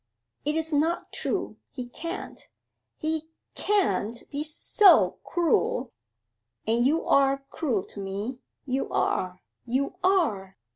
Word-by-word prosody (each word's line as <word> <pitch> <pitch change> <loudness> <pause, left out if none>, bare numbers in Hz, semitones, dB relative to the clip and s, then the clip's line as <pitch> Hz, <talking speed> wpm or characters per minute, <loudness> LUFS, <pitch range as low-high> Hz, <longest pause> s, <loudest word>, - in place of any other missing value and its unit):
'It 300 +1 +1
is 320 0 0
not 320 +4 +1
true! - - -2
He 250 -2 -6
can't, 335 +7 -7 0.5
he 315 +1 0
c 315 - -21 0.3
can't 360 - 0
be 285 - -3
s 305 +1 -1
so 385 +5 +5
cruel 300 -7 +1 0.7
and 230 +2 +2
you 300 +6 +2
are 275 0 +3
cruel 240 - 0
to - - -11
me 200 +6 -4 0.3
you 265 0 -1
are, 185 0 0 0.3
you 265 +4 -1
are! 215 - +1
275 Hz, 130 wpm, -27 LUFS, 235-320 Hz, 0.7 s, so